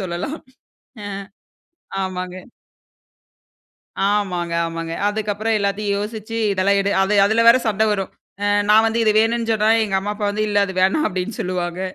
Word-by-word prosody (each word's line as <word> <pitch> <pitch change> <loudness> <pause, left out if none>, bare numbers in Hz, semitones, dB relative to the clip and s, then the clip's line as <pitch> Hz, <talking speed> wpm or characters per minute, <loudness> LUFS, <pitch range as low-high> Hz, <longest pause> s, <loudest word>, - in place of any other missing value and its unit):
சொல்லலாம். 185 - -4 0.6
அ. 205 - -6 0.9
ஆமாங்க. 185 -1 -4 1.7
ஆமாங்க, 180 -5 -1
ஆமாங்க. 165 0 -5 0.2
அதுக்கப்பறம் 215 +1 -1
எல்லாத்தையும் 200 0 -1
யோசிச்சு, 220 +2 -5 0.2
"இதெல்லாம் 200 +1 +2
எடு", 200 +1 0
அது 200 +2 +1
அதுல 220 +3 +2
வேற 235 - +8
சண்ட 215 -1 +1
வரும். 195 -2 -3 0.3
அ 205 - +1 0.2
நான் 220 +1 +6
வந்து 225 +1 0
"இது 215 - +4
வேணுன்னு" 230 +1 +1
சொன்னா, 215 0 +1 0.2
எங்க 195 -2 -1
அம்மா 205 +2 -3
அப்பா 205 0 -3
வந்து, 215 +1 -1
"இல்லை 205 -1 +2
அது 190 - -6
வேணாம்" 190 +12 +2
அப்டீன்னு 185 +3 -4
சொல்லுவாங்க 180 0 -3
205 Hz, 150 wpm, -20 LUFS, 185-215 Hz, 1.7 s, வேற